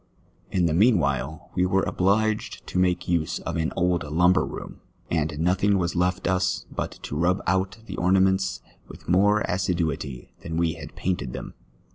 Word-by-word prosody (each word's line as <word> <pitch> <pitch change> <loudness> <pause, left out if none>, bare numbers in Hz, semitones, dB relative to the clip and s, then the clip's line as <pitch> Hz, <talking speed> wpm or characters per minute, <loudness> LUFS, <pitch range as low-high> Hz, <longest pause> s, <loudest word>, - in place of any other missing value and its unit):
In 90 -2 +1
the 80 - +1
mean 105 +6 +5
while 70 +1 -2
we 90 - +1
were 95 +1 +2
obli}2jed 105 +3 0
to 90 - -2
make 90 -1 +1
use 85 -3 0
of - - -4
an 80 0 0
old 90 -1 +1
lumber 90 +5 +3
room, - - -7 0.3
and 75 -2 0
nothing 95 +5 +2
was 85 -1 -1
left 90 +1 0
us 95 0 0
but - - -3
to - - -5
rub 90 +5 +2
out 95 +3 0
the 95 - -7
ornaments 95 +1 +2 0.3
with - - -13
more 105 +4 +4
assiduity 80 -9 -2
than 80 0 -4
we 85 -1 +1
had 80 -2 -10
painted 90 -9 -2
them. - - -7
90 Hz, 170 wpm, -25 LUFS, 80-95 Hz, 0.3 s, mean